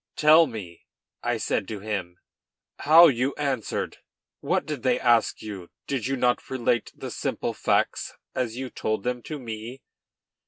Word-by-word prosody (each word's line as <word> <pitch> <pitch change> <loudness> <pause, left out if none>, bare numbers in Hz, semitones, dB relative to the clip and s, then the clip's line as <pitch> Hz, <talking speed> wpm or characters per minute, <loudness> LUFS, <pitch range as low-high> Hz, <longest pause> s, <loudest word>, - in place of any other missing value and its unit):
"Tell 155 +2 +6
me," 100 -9 -9 0.3
I - - 0
said - - -1
to 110 -2 -5
him, 95 -4 -4 0.6
"how 160 +4 +8
you 130 +1 0
answered. 135 -6 -2 0.4
What - - 0
did 150 -3 -4
they 125 0 +2
ask 120 -2 +2
you? 100 -5 -7 0.2
Did 130 -4 -2
you 135 - 0
not 125 -1 +1
relate 120 -3 0
the - - -7
simple - - -2
facts - - 0 0.2
as 120 -2 -2
you 130 -2 -5
told 110 -2 -2
them 125 0 -2
to 155 +5 -6
me?" 120 +1 -7
120 Hz, 155 wpm, -26 LUFS, 110-135 Hz, 0.6 s, how